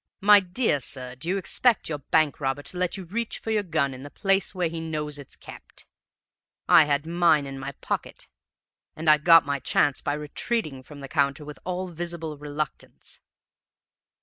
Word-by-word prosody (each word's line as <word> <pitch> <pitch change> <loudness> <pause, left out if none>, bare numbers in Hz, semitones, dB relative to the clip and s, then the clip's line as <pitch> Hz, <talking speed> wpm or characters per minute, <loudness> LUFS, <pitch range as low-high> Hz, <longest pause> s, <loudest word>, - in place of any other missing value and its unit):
My 205 +1 +8
dear 185 - 0
sir, 125 -1 -4
do 130 +7 -6
you 195 - +1
expect 230 +5 +1
your 150 -2 -3
bank 155 +1 +1
robber 135 0 -2
to - - -3
let 180 +1 -1
you 190 - -7
reach 220 +6 -4
for 225 - -5
your 215 -1 +2
gun 155 -7 -1
in 130 - -10
the 145 - -9
place 195 +4 0
where 180 -2 0
he 165 0 -5
knows 150 -2 -3
it's 140 - -10
kept? - - -12 0.8
I 160 - +7
had 145 0 0
mine 165 -3 +3
in 135 -1 -7
my 140 +1 -6
pocket, - - -4 0.7
and 160 +1 -6
I 155 0 +7
got 165 +1 +7
my 140 0 -1
chance 140 +2 +1
by 145 - -1
retreating 150 - -3
from 145 +2 -12
the 135 - -7
counter 140 0 0
with 150 0 -9
all 185 +1 -3
visible 170 -2 -5
reluctance.' 150 0 -6
155 Hz, 185 wpm, -25 LUFS, 145-180 Hz, 0.8 s, My